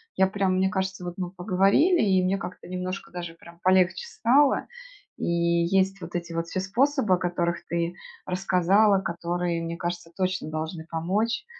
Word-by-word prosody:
Я 190 - +4
прямо 195 -1 0
Мне 190 +1 +2
кажется, 190 -1 -2
что - - -6
вот 175 0 -5
мы 180 -1 -2
поговорили, 195 - +3
и 190 -3 +3
мне 185 +2 +1
как-то 180 -1 -8
немножко 185 +1 -5
даже 175 -2 -6
прям 170 0 -16
полегче 185 - +3
стало. 280 - +3 0.5
И - - -3
есть 170 +3 +1
вот - - -8
эти 170 -1 -4
вот 165 0 -2
все 185 - -3
способы, 240 +2 +2
о - - -3
которых 175 -1 -1
ты 170 0 -1 0.3
рассказала, 195 +2 +3
которые, 170 -1 -2
мне 165 0 -4
кажется, 175 0 -4
точно 185 -3 -1
должны 160 +1 -4
помочь. 195 +8 -1
185 Hz, 170 wpm, -26 LUFS, 170-195 Hz, 0.5 s, Я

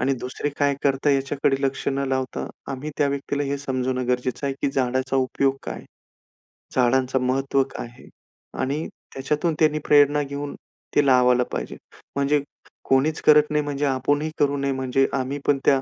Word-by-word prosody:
आणि 135 - +2
दुसरे 130 +3 -3
काय 145 -1 +2
करता 140 +1 +2
याच्याकडे 135 0 +1
लक्ष 135 0 -1
न 140 0 -1
लावता, 130 -1 -2 0.3
आम्ही 135 +3 -5
त्या 145 - +3
व्यक्तीला 140 +1 -2
हे 140 0 -2
समजावणं 130 -2 -2
गरजेचं 125 +2 -1
आहे, 135 - -1
की 140 - +2
झाडाचा 130 0 0
उपयोग 135 +1 +1
काय? - - -6 0.9
झाडांचं 130 +1 +2
महत्त्व 135 +1 +1
काय - - -5
आहे? 120 +1 -16 0.5
आणि 140 +5 -1 0.3
त्याच्यातून 150 +5 -1
त्यांनी 155 -1 +3
प्रेरणा 145 0 +5
घेऊन 140 +1 -5 0.4
ते 145 - +4
लावायला 125 -2 +5
पाहिजे. - - -4 0.4
म्हणजे 140 +1 +2 0.5
कोणीच 140 +4 +2
करत 150 0 +5
नाही 150 0 +1
म्हणजे 145 0 -2
आपणही 145 +3 0
करू 145 -1 +2
नये, 140 0 0
म्हणजे 130 0 +1
आम्ही 135 +2 -2
पण 145 - +4
त्या 135 -1 +4
135 Hz, 165 wpm, -23 LUFS, 130-145 Hz, 0.9 s, प्रेरणा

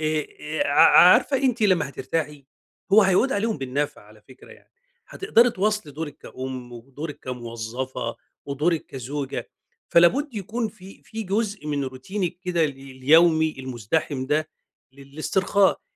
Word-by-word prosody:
آآ، 155 -1 -1
آآ، 155 +1 -2
ع 145 - +3 0.2
عارفة 185 +10 +6
أنتِ 255 -3 0
لمّا 185 -8 +3
هترتاحي، 145 +1 -4 0.5
هو 215 +1 +8
هيعود 195 +8 +3
عليهم 220 0 -1
بالنفع 135 0 -3
على 105 0 -19
فكرة 130 - -16
يعني. - - -21 0.4
هتقدري 245 - +3
تواصلي 210 -7 -1
دورِك 145 -1 -6
كأُم، 130 -1 -7
ودورِك 135 +6 -8
كموظفة، 120 0 -5 0.3
ودورِك 150 +3 -1
كزوجة. 135 +2 -5 0.4
فلا 170 0 +7
بد 280 - -4
يكون 220 +3 -3
في 195 -2 -15
في 220 0 -6
جزء 205 -4 -2
من 145 -2 -1
روتينِك 170 +9 -4
كده 180 -3 0
ال 150 - 0
اليومي 155 +5 +3
المزدحم 130 +2 -2
ده 155 +3 0 0.4
للاسترخاء. 155 +8 0
155 Hz, 135 wpm, -24 LUFS, 130-195 Hz, 0.5 s, هو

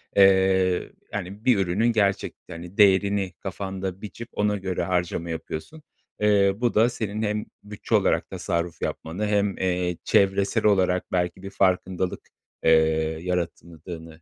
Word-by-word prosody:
eee, 95 -2 +4 0.2
hani, 100 +2 -6
bir 125 -5 +5
ürünün 100 +5 +1
gerçekte, 100 -5 -1
hani, 85 +3 -10
değerini 100 -1 +4
kafanda 95 +1 -5
biçip 115 +3 -8
ona 105 0 +1
göre 95 -2 -2
harcama 85 -1 -1
yapıyorsun. 80 - -6 0.4
Eee, 100 -2 +4
bu 120 0 0
da 115 +3 +4
senin 110 -3 -4
hem 105 0 -1 0.2
bütçe 105 0 -2
olarak - - +2
tasarruf 85 0 -3
yapmanı 90 +7 -3
hem, 105 -1 +1
eee, 90 -2 -1
çevresel 100 +1 +2
olarak 95 -3 +2
belki 90 0 -1
bir 95 - -6
farkındalık, 95 -1 0 0.4
eee, 80 - +5 0.5
yarattığını 85 -2 -5
95 Hz, 130 wpm, -25 LUFS, 90-105 Hz, 0.5 s, bir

